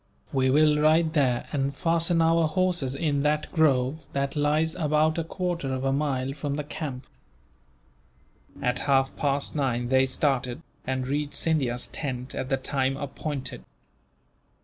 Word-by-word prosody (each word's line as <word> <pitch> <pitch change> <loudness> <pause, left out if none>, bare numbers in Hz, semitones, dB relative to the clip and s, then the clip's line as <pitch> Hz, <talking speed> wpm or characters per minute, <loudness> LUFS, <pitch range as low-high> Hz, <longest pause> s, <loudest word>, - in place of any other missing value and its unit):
We 130 -1 +2
will 150 +2 +4
ride 155 +1 +4
there, 130 -6 +2
and 140 -1 -1
fasten 165 0 +2
our 165 0 +3
horses 170 -5 0
in 145 -1 0
that 150 +1 0
grove 145 -1 +2
that 140 +1 -1
lies 150 +2 +2
about 155 0 +1
a - - 0
quarter 170 -4 -3
of 130 0 -2
a 135 0 +1
mile 135 -2 -1
from 140 0 -3
the 150 - -3
camp." 140 -3 -6 1.6
At 125 0 +1
half 135 -1 +3
past 140 0 -1
nine 125 -4 0
they 130 0 +4
started, 130 -2 -1 0.2
and 130 -1 -1
reached 145 +1 -2
Scindia's 130 -7 0
tent 130 -3 -4
at 130 - -4
the 135 - +2
time 135 0 -1
appointed. 145 0 -4
140 Hz, 150 wpm, -26 LUFS, 130-155 Hz, 1.6 s, will